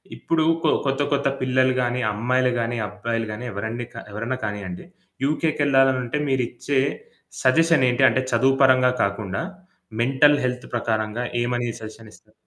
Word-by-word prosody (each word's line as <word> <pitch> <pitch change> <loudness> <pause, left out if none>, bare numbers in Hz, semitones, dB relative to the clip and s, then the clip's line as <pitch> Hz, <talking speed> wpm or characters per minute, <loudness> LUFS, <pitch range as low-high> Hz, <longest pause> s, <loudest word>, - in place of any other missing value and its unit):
ఇప్పుడు 165 -1 0 0.2
కొ 155 - +3
కొత్త 135 +1 0
కొత్త 140 0 +1
పిల్లలు 130 0 +2
గాని, 125 0 -1
అమ్మాయిలు 125 +4 +1
గానీ, 115 +1 -2
అబ్బాయిలు 115 +3 -3
గానీ, 115 +4 -7
ఎవరండి 110 +4 -4
కా 115 - -7
ఎవరన్నా 115 +5 -3
కానియ్యండి 100 -4 -6 0.4
యుకెకెళ్ళాలనుంటే 140 -4 +1
మీరిచ్చే 130 +1 -1 0.6
సజెషన్ 155 +1 +4
ఏంటి? 125 +2 +1
అంటే 130 - 0
చదువు 130 +3 +3
పరంగా 130 -1 +5
కాకుండా 100 - -2 0.6
మెంటల్ 135 +4 +4
హెల్త్ 125 -1 -3
ప్రకారంగా 110 -1 -1 0.2
ఏమని 120 0 -1
సజెషనిస్తారు? 110 0 -13
125 Hz, 130 wpm, -23 LUFS, 115-135 Hz, 0.6 s, పరంగా